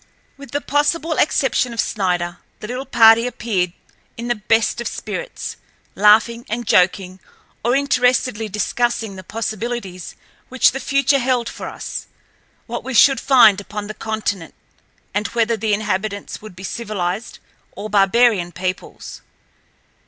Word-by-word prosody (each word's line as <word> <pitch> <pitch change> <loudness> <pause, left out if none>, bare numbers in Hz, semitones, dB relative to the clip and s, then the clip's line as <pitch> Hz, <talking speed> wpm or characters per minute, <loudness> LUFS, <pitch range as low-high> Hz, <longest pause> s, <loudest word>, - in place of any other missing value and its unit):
With 280 0 -12
the 285 - -2
possible 295 +4 0
exception 265 -5 +1
of 230 - -8
Snider, 175 -3 -1 0.2
the 210 - -7
little 255 +3 -5
party 225 +1 +6
appeared 200 -7 -1 0.5
in 235 +1 -5
the - - +3
best 225 +1 +1
of 235 - -3
spirits, - - -6 0.4
laughing 220 +3 +4
and 235 +2 -3
joking, 185 0 +2 0.4
or 240 +3 +2
interestedly 250 -5 +1
discussing 220 0 -1
the 185 - -9
possibilities 220 -4 -5 0.3
which 260 0 +4
the 270 - -5
future 275 0 +2
held 245 -2 0
for - - -6
us: - - -6 0.6
what - - -5
we 265 -1 -5
should 270 +4 +6
find 240 -7 +5
upon 210 +1 -6
the 215 - -6
continent, 215 -6 -4 0.6
and 205 +1 0
whether 230 -1 +1
the 220 0 -2
inhabitants 205 -1 -2
would 215 -4 -11
be 190 - -11
civilized 210 -1 -4 0.4
or 200 +2 -6
barbarian 200 -2 +3
peoples. 185 +1 -5
225 Hz, 135 wpm, -20 LUFS, 200-245 Hz, 0.6 s, party